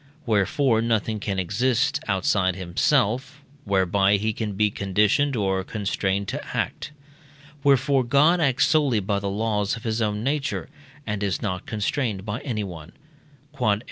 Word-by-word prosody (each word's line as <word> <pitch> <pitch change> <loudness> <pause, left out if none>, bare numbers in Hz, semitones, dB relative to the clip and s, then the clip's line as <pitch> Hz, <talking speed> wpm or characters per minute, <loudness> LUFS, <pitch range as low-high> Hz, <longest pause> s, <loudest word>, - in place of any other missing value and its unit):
Wherefore 115 +3 +2
nothing 110 -1 0
can 100 -1 -3
exist; 125 - +1
outside 95 -1 +1
himself, 130 +9 0 0.2
whereby 100 0 +2
he 110 +2 -1
can 105 -1 -3
be 105 +1 +1
conditioned 105 +9 +1
or 95 -3 0
constrained 100 -1 -2
to - - -4
act. - - -3 0.7
Wherefore 135 -1 +3
God 145 +8 +4
acts 135 -4 +3
solely 145 -8 +3
by 100 0 -1
the 100 0 -3
laws 105 0 -1
of 115 - -10
his 110 -1 -1
own 105 0 -1
nature, 140 +2 -2 0.4
and 105 -2 -3
is 100 -4 -1
not 95 -4 -3
constrained 105 -2 -2
by 105 +3 -3
anyone. 100 - -5 0.6
Q.E. 110 -6 +2
105 Hz, 140 wpm, -24 LUFS, 100-130 Hz, 0.7 s, God